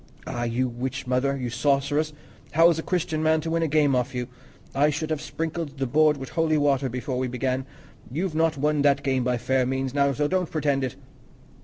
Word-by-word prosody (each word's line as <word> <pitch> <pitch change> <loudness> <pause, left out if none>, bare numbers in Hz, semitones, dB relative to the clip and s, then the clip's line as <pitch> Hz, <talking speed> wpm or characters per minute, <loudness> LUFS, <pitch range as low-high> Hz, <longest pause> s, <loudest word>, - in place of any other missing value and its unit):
"Ah, 120 0 -3
you 120 +2 0
witch 130 +3 -4
mother, 130 +2 +1
you 125 -3 -3
sorceress! 145 +4 +1 0.4
How 165 +3 +6
is 165 - -1
a - - -1
Christian 160 -3 -1
man 160 0 +3
to 160 +1 -4
win 165 0 +1
a 165 - +2
game 145 -2 +3
off 125 +1 -1
you? 125 0 -3 0.4
I 145 +2 +3
should 155 +2 -3
have 155 -2 -1
sprinkled 160 -2 -4
the 135 - -1
board 150 +3 +3
with 135 -1 -7
holy 160 -2 +1
water 140 -2 +2
before 125 +1 -3
we 130 - 0
began. 130 +1 -2 0.4
You've 170 +5 -2
not 160 -1 +1
won 150 +1 +1
that 140 -1 +3
game 130 -2 +1
by 125 0 +1
fair 130 +2 +1
means, 130 +1 -2
now, 140 -1 +3
so 145 +2 0
don't 180 0 0
pretend 145 -3 0
it." 130 - -3
140 Hz, 215 wpm, -25 LUFS, 130-155 Hz, 0.4 s, How